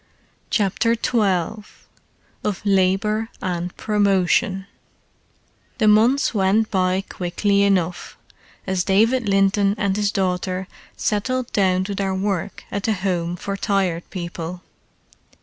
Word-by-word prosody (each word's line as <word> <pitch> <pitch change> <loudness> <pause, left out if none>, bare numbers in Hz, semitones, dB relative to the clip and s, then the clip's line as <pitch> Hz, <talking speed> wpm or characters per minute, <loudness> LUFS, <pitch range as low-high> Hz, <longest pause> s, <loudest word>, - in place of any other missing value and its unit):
CHAPTER 220 +3 +1
XII 210 -3 0 0.8
OF 205 -3 -2
LABOUR 200 +3 +2
AND 180 -1 -3
PROMOTION 195 -1 +1 1.1
The 215 - +2
months 230 +7 +4
went 210 +2 +2
by 185 -1 +1
quickly 200 +3 0
enough, 185 -3 0 0.5
as 190 -2 0
David 220 +4 +2
Linton 195 +1 +3
and 200 -2 0
his 205 -1 +1
daughter 185 -1 -1 0.3
settled 250 +4 -1
down 185 -2 +2
to 200 +2 -4
their 195 -1 -1
work 195 -2 -2
at 200 - -2
the 220 - +2
Home 180 -3 -2
for 200 +3 -4
Tired 195 -5 -1
People. 175 -1 -6
195 Hz, 115 wpm, -21 LUFS, 185-210 Hz, 1.1 s, months